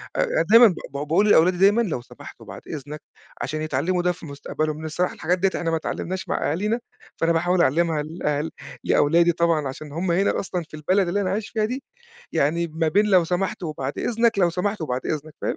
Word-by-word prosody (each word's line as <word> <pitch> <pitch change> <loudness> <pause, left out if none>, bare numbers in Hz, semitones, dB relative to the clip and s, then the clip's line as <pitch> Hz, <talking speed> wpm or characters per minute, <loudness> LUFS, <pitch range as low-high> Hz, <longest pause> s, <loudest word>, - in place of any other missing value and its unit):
أ - - +1
دايمًا 230 +2 +9
ب - - +2 0.2
ب - - -31
باقول 150 +9 +1
للأولادي 180 -2 +5
دايمًا 200 +5 +5
لو 175 - -2
سمحت - - -13
وبعد - - -10
إذنك، 150 0 -7 0.4
عشان 155 +1 -3
يتعلّموا 155 +5 0
ده 180 0 +2
في 175 -1 -10
مستقبلهم، 155 +1 -3
لإن 160 - -7
الصراحة 175 +3 -1
الحاجات 180 +3 0
ديّة 195 +2 +3
إحنا 165 -1 -1
ما - - +1
اتعلّمناهاش 185 +3 -4
مع - - 0
أهالينا، 210 +8 -1 0.4
فأنا 165 0 +2
باحاول 175 +2 +2
أعلّمها 160 0 +2
لأل 155 -1 -2 0.3
لأولادي 170 +3 +4
طبعًا 165 -3 +1
عشان 145 +3 -8
هم 170 +4 -1
هنا 190 +4 +2
أصلًا 180 -2 -3
في 155 - -24
البلد 185 +5 +1
اللي 200 +4 0
أنا 185 - -1
عايش 210 +2 -3
فيها 215 -1 0
دي، 250 +4 -4 0.5
يعني 170 +4 +1
ما 160 0 -1
بين 205 +7 +3
لو 190 -4 +4
سمحت 180 +2 -2
وبعد 145 -4 -4
إذنك، 230 -2 +1
لو 175 -2 +4
سمحت 185 +3 -2
وبعد 130 -5 -2
إذنك، 155 0 -4
فاهم؟ - - -1
170 Hz, 210 wpm, -23 LUFS, 155-190 Hz, 0.5 s, دايمًا